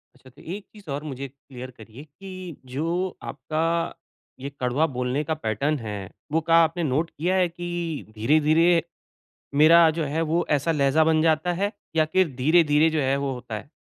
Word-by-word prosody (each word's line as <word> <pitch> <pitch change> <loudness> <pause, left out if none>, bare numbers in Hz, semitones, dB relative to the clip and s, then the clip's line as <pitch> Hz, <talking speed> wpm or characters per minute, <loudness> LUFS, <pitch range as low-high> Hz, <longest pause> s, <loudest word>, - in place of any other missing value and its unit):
अच्छा 130 0 -18
तो, 130 - -19
एक 195 +5 -7
चीज़ 205 -7 -15
और 145 +2 -3
मुझे 140 -2 -6
क्लियर 130 -1 -11
करिए 115 +5 -12
कि 185 +2 -10 0.2
जो 170 +6 -2
आपका 165 +4 -2 0.4
ये 140 +2 -5
कड़वा 125 +5 +1
बोलने 125 +3 -1
का 160 +2 -2
पैटर्न 145 +2 -1
है, 105 -4 -6 0.2
वो 160 - +2
का 165 +1 +2
आपने 165 +1 -1
नोट 155 +4 0
किया 180 +5 -1
है 185 -1 +3
कि, 175 -2 -5
धीरे-धीरे 155 +7 +3 0.8
मेरा 165 +2 +7
जो - - 0
है 150 +3 -1
वो 170 +1 +2
ऐसा 150 +2 +2
लहज़ा 145 +1 +3
बन 160 0 +3
जाता 160 +2 +2
है, 200 +4 -1 0.2
या 155 - +5
फिर 185 -2 +3
धीरे-धीरे 155 +2 +4
जो 155 - 0
है 135 0 +1
वो 140 -1 -2
होता 125 -2 -8
है? 140 - -14
155 Hz, 180 wpm, -24 LUFS, 135-170 Hz, 0.8 s, मेरा